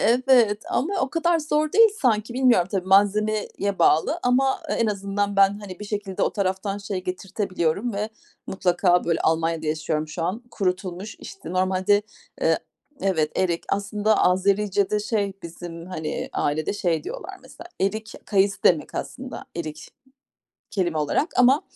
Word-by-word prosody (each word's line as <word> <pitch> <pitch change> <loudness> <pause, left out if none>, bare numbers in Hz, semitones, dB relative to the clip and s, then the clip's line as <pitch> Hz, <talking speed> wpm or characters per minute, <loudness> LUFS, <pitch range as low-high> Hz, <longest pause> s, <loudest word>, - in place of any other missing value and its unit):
Evet. 235 -3 +4
Ama 350 +9 0
o 265 - 0
kadar 340 0 +2
zor 305 0 0
değil 455 +2 +7
sanki. 225 -2 +1
Bilmiyorum 245 -9 +4
tabii 190 -2 -2
malzemeye 210 +2 +3 0.3
bağlı 165 - +3
ama 265 +2 +2
e - - -1
en 230 - +1
azından 200 0 -1
ben, 195 +1 +4
hani, 195 -2 -9
bir 210 - -5
şekilde 205 -2 -3
o - - +1
taraftan 195 0 -1
şey 195 -2 -5
getirtebiliyorum 185 +2 -2
ve 210 +2 -2 0.4
mutlaka, 180 -1 +2
böyle 165 -1 0
Almanya'da 165 0 0
yaşıyorum 155 0 -1
şu 160 +2 -5
an. 195 +7 -2
Kurutulmuş, 190 0 -3
işte, 390 -2 -9
normalde, 185 +2 +2 0.4
eee - - +3 0.4
Evet, 160 -6 +1
erik. 175 -2 0
Aslında 205 +2 +1
Azericede 200 +2 +2
şey 210 -2 -1
bizim, 170 0 -8
hani, 160 -4 -4
ailede 150 +4 0
şey 175 -5 -1
diyorlar - - -6
mesela, 345 +1 -13
erik 215 +3 -1
kayısı 200 -1 +2
demek 160 -4 +3
aslında 260 0 -6
erik 155 -2 -6 0.8
kelime 175 -5 -1
olarak. 150 - +1
Ama 255 +4 +5
200 Hz, 145 wpm, -24 LUFS, 180-220 Hz, 0.8 s, değil